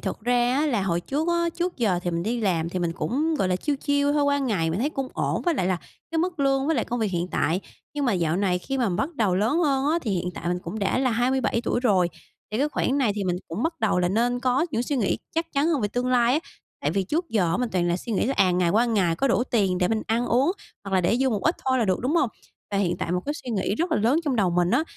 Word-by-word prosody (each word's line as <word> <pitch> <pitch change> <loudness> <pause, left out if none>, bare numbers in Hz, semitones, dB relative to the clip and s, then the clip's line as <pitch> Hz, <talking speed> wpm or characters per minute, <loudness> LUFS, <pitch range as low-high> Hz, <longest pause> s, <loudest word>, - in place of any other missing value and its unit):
thật - - -4
ra 245 +2 +2
á 295 +3 +2
là 230 -9 +1
hồi 175 -3 0
trước 295 - -2
á, 340 0 +2
trước 350 +1 -2
giờ 205 -8 +1
thì 175 - -1
mình 170 0 -2
đi 235 +3 -1
làm 170 -5 0
thì 185 - -3
mình 170 -2 -1
cũng, 300 - -1
gọi 195 -11 0
là, 180 - +1
chill 290 +7 -1
chill 285 0 +1
thôi, 295 -1 +2
qua 285 0 +2
ngày 205 -12 0
mình 165 - -2
thấy 290 - 0
cũng 270 -3 -3
ổn - - -1
với 345 -2 +1
lại 185 - 0
là 185 -1 +1 0.3
cái 330 - -1
mức 345 -1 -1
lương 270 0 +2
với 325 - +2
lại 230 - +1
công 245 0 -3
việc 215 -3 0
hiện 175 0 -2
tại. 170 +5 0 0.3
Nhưng 290 - -1
mà 245 - +2
dạo 170 -3 0
này 185 -2 +1
khi 270 +8 -4
mà 240 - +2
bắt 275 - -2
đầu 210 -8 +1
lớn 220 - +1
hơn 280 -5 +1
á, 335 - +2
thì 220 - -2
hiện 180 -1 -1
tại - - -4
mình 180 0 0
cũng 180 +5 -6
đã 195 +4 0
là 260 -1 +2
27 240 0 +1
tuổi 240 - 0
rồi, 195 -8 +3 0.4
thì 215 - -1
cái 290 +3 +2
khoảng 280 -1 0
này 245 -7 +2
thì 205 -1 -2
mình 180 -1 0
cũng 170 +8 -4
bắt 325 -1 -2
đầu 220 -4 +2
là 180 0 +2
nên 240 +5 +1
có 260 +5 +1
những 235 -4 0
suy 280 +3 -2
nghĩ 220 -6 0 0.2
chắc 330 0 -2
chắn 280 +1 +2
hơn 320 -5 +1
về 205 - 0
tương 245 +4 -2
lai 245 -1 +3
á. 305 - +1 0.4
Tại - - 0
vì 195 - 0
trước 325 - -2
giờ 180 -6 +1
mình 250 -1 -1
toàn 175 -2 +1
là 175 - +1
suy 225 +5 -6
nghĩ 210 - +1
là, 270 - 0
à, 185 - +4
ngày 175 -1 +2
qua 220 +6 +3
ngày 195 -8 +1
có 275 - +1
đủ 240 - +2
tiền 195 -8 +1
để 180 -1 +2
mình 220 +1 0
ăn 230 +2 0
uống, 270 +8 +2 0.3
hoặc 195 -1 -3
là 185 - +4
để 180 +6 +2
dư 265 +1 +2
một 210 -4 -1
ít 325 - +2
thôi 260 0 +3
là 235 - +2
được, 185 -3 0
đúng 270 +7 0
hông? 280 - +3 0.4
Và 200 - -1
hiện 180 -3 +1
tại 170 - -3
một 180 - +1
cái 290 - -1
suy 260 -5 -7
nghĩ 200 -2 0
rất 335 +7 -1
là - - +3
lớn 235 +8 +3
trong 280 -5 0
đầu 195 -5 +2
mình 175 +1 +2
á - - +3
235 Hz, 310 wpm, -25 LUFS, 185-275 Hz, 0.4 s, à